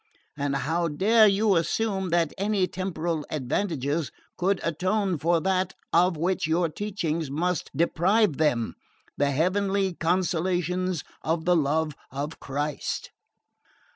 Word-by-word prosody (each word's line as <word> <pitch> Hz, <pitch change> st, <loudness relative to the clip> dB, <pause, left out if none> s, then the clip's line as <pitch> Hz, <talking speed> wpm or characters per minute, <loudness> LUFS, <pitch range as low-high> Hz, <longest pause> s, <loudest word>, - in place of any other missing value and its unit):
And 140 Hz, -1 st, -1 dB
how 160 Hz, +6 st, 0 dB
dare 215 Hz, +8 st, +5 dB
you 200 Hz, 0 st, +3 dB
assume 190 Hz, +2 st, 0 dB
that 170 Hz, -2 st, +1 dB
any 200 Hz, -1 st, +1 dB
temporal 175 Hz, -4 st, -3 dB
advantages 150 Hz, +1 st, -1 dB, 0.2 s
could 190 Hz, +1 st, +1 dB
atone 185 Hz, +2 st, 0 dB
for 170 Hz, +2 st, +2 dB
that 190 Hz, 0 st, 0 dB, 0.2 s
of 180 Hz, -1 st, +4 dB
which 175 Hz, 0 st, 0 dB
your 165 Hz, +1 st, +2 dB
teachings 170 Hz, -5 st, -3 dB
must 170 Hz, +4 st, -1 dB
deprive 175 Hz, +2 st, +2 dB
them 125 Hz, -8 st, +1 dB, 0.4 s
the 145 Hz, 0 st, +1 dB
heavenly 190 Hz, +5 st, +1 dB
consolations 180 Hz, 0 st, 0 dB, 0.2 s
of 160 Hz, +1 st, -1 dB
the 180 Hz, 0 st, +4 dB
love 155 Hz, 0 st, +1 dB, 0.2 s
of 145 Hz, +4 st, -5 dB
Christ?" 145 Hz, +1 st, -3 dB
170 Hz, 120 wpm, -26 LUFS, 155-190 Hz, 0.4 s, dare